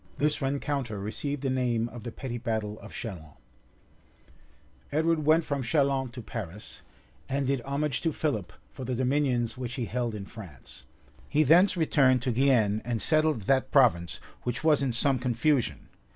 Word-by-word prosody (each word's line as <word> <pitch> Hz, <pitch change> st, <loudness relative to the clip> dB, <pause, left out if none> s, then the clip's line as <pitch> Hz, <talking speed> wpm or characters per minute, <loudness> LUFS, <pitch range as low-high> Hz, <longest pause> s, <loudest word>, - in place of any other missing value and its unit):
[] -, -, -28 dB
This 150 Hz, +1 st, +1 dB
rencounter 135 Hz, -5 st, -2 dB
received 140 Hz, +8 st, -4 dB
the 135 Hz, -, 0 dB
name 120 Hz, -3 st, 0 dB
of 120 Hz, 0 st, -9 dB
the 120 Hz, -, -6 dB
petty 120 Hz, -1 st, -5 dB
battle 110 Hz, -3 st, -3 dB
of -, -, -11 dB
Chalons. 85 Hz, -10 st, -7 dB, 1.5 s
{1274.} 145 Hz, -, 0 dB
Edward 160 Hz, -1 st, +1 dB
went 160 Hz, +1 st, +5 dB
from 140 Hz, -2 st, -2 dB
Chalons 135 Hz, -1 st, +1 dB
to 125 Hz, -3 st, -8 dB
Paris, 105 Hz, -3 st, -7 dB, 0.5 s
and 135 Hz, +1 st, 0 dB
did 135 Hz, -1 st, 0 dB
homage 140 Hz, +1 st, -2 dB
to 165 Hz, -, +1 dB
Philip 135 Hz, -, -2 dB, 0.2 s
for 130 Hz, -, -8 dB
the 125 Hz, 0 st, -2 dB
dominions 130 Hz, -2 st, 0 dB
which 120 Hz, -2 st, -4 dB
he 120 Hz, -, -2 dB
held 120 Hz, -1 st, -2 dB
in 100 Hz, -2 st, -6 dB
France.[] 95 Hz, -, -12 dB, 0.4 s
He 155 Hz, -, +3 dB
thence 180 Hz, +6 st, +5 dB
returned 135 Hz, -6 st, +3 dB
to 125 Hz, -, 0 dB
Guienne, 115 Hz, -5 st, +3 dB
and 120 Hz, -1 st, -2 dB
settled 155 Hz, -4 st, +2 dB
that 130 Hz, +4 st, +2 dB
province, 95 Hz, -11 st, +3 dB, 0.2 s
which 120 Hz, +2 st, -3 dB
was 155 Hz, -3 st, +4 dB
in 135 Hz, -2 st, +1 dB
some 130 Hz, +2 st, +2 dB
confusion. 125 Hz, +2 st, 0 dB
130 Hz, 170 wpm, -28 LUFS, 115-140 Hz, 1.5 s, went